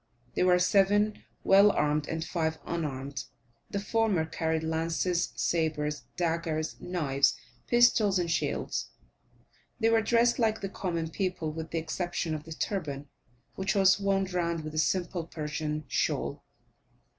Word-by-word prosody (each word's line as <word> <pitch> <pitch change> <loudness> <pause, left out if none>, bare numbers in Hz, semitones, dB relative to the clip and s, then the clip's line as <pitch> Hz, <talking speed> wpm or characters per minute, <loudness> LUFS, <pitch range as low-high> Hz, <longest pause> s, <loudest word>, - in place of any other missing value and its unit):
There 180 - +2
were 180 0 +6
seven 205 +3 +3 0.2
well 200 +2 +7
armed, 150 -4 +1
and 160 0 -3
five 160 -3 -1
unarmed. 140 -4 -4 0.4
The 200 - -2
former 205 -5 +1
carried 160 0 -1
lances, 165 +2 0
sabres, 150 -3 -1
daggers, 165 -2 -1
knives, 145 -6 +1 0.3
pistols, 230 -5 +4
and 175 -2 0
shields; - - -1 0.9
they 225 -1 +3
were 225 -1 +4
dressed 235 +2 +3
like 220 -2 +1
the 195 - -3
common 170 -4 -3
people, 180 -4 -2
with 160 0 -6
the 165 - -3
exception 165 0 -2
of 155 -1 -5
the 160 - -7
turban, 145 -7 -3 0.4
which 190 +1 -1
was 195 0 +5
wound 195 -2 0
round 170 -2 -1
with 155 0 -6
a 155 - 0
simple 175 0 0
Persian 150 -1 -3
shawl. - - -1
170 Hz, 140 wpm, -29 LUFS, 160-195 Hz, 0.9 s, well